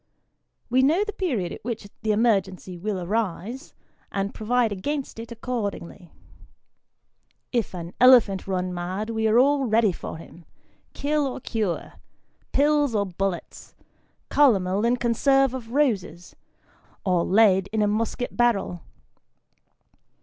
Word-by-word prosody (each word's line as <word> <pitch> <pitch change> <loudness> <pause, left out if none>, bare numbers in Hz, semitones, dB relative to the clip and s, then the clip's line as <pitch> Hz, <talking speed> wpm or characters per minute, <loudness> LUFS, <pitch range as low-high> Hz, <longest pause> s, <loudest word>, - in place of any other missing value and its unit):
We 255 +1 +3
know 315 +9 +3
the 420 0 -5
period 255 - -2
at - - -9
which 225 -2 -5
the 220 -1 0
emergency 195 -4 0
will 195 +2 -3
arise, 215 - -3 0.4
and 200 +1 -2
provide 230 +1 +1
against 265 +6 -4
it 230 +1 -8
accordingly. 205 -7 -5 1.4
If 235 -6 -1
an 170 0 -7
elephant 240 -7 +6
run 185 -1 -2
mad, 185 +5 -4
we 220 0 0
are 220 +1 +3
all 275 +2 +4
ready 220 -2 +3
for 170 - -7
him 165 +1 -14 0.5
kill 295 0 0
or 260 - -5
cure 215 -8 -3 0.6
pills 290 -3 +2
or 200 -1 +1
bullets, 190 -1 -5 0.6
calomel 205 -7 +3
in 245 +1 +2
conserve 270 +3 +2
of 235 -3 -7
roses, 210 - -1 0.7
or 180 -3 +2
lead 195 -2 +4
in 215 -1 +1
a - - +2
musket 225 +3 -2
barrel. 220 -7 +1
220 Hz, 130 wpm, -24 LUFS, 190-250 Hz, 1.4 s, elephant